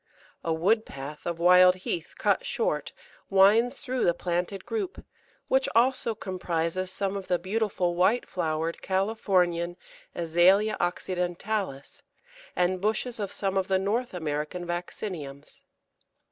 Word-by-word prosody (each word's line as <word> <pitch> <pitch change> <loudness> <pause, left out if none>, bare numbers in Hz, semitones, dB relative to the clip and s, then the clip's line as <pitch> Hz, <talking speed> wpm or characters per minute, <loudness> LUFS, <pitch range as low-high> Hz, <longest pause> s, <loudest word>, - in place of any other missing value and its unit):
A 165 - -1
wood 195 +8 +2
path 140 0 -8
of 170 -1 -2
wild 180 +1 +7
heath 175 -2 -4
cut - - +2
short - - -1 0.4
winds 215 +7 +4
through 260 -2 -2
the 170 - +3
planted 180 +2 -2
group, 405 -5 -4 0.4
which 265 0 +2
also 235 -1 +3
comprises 180 -2 -2
some 195 +1 -2
of 195 -1 -5
the 180 - +2
beautiful 185 -1 -1
white 190 +8 +2
flowered 165 -1 -2
Californian 185 -3 +1 0.4
Azalea 180 +6 +4
occidentalis, 180 -2 -2 0.5
and 180 +1 +1
bushes 220 +3 0
of 200 -2 -3
some 195 -1 -1
of 190 -1 +1
the 190 - +2
North 210 +4 -1
American 155 +2 -3
Vacciniums. 175 -5 -5
185 Hz, 125 wpm, -27 LUFS, 175-210 Hz, 0.5 s, wild